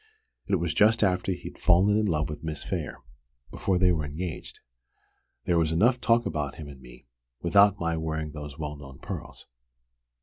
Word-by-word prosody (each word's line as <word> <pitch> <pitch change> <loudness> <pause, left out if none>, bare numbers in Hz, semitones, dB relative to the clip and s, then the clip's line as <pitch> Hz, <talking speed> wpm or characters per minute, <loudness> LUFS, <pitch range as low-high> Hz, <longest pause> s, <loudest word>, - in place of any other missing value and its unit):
It 100 - +2
was 85 -3 -1
just 110 +1 +4
after 95 0 +1
he'd 90 - -7
fallen 95 +4 +4
in 105 0 +2
love 75 -5 0
with 75 0 -7
Miss 80 -2 -4
Phayre 65 - -4 0.5
before 95 -2 0
they 90 0 +4
were 80 -3 0
engaged. 80 +4 -6 0.9
There 85 -1 +2
was 80 -1 +1
enough 120 +10 +3
talk 120 0 +3
about 75 -2 -3
him 75 - -8
and 70 -2 -12
me, - - -15 0.4
without 100 +3 +5
my 85 -1 0
wearing 80 -1 -3
those 75 -1 -8
well 75 -1 -4
known 70 -2 -11
pearls. - - -8
80 Hz, 175 wpm, -27 LUFS, 75-95 Hz, 0.9 s, without